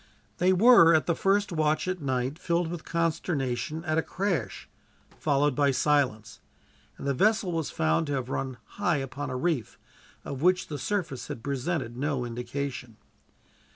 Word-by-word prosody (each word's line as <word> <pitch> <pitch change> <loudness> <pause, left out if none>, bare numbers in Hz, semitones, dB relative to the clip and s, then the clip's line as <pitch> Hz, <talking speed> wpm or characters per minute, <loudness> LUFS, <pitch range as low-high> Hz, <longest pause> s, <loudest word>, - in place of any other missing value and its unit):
They 180 +1 +4
were, 185 -4 +7
at 155 -5 +2
the 170 - +2
first 200 +4 +1
watch 155 0 +1
at 185 -2 -2
night, 130 +2 -2
filled 170 -1 0
with 170 -2 -6
consternation 160 -2 -2
at 155 -1 +1
a - - +2
crash, 175 - -3 0.5
followed 145 -1 +2
by 140 +2 +2
silence; 130 -5 +1 0.6
and - - -8
the 140 - +1
vessel 210 - +2
was 165 -4 -2
found 80 - +1
to 145 - -2
have 130 -3 -2
run 130 -1 -3 0.2
high 175 -6 +2
upon 135 +1 -4
a 130 - -3
reef, 140 - -1 0.5
of 140 -1 -5
which 180 +2 +2
the 145 -2 -4
surface 165 -5 -3
had 115 - -7
presented 140 -2 -2
no 135 -2 -1
indication. 120 0 -5
150 Hz, 160 wpm, -27 LUFS, 130-170 Hz, 0.6 s, were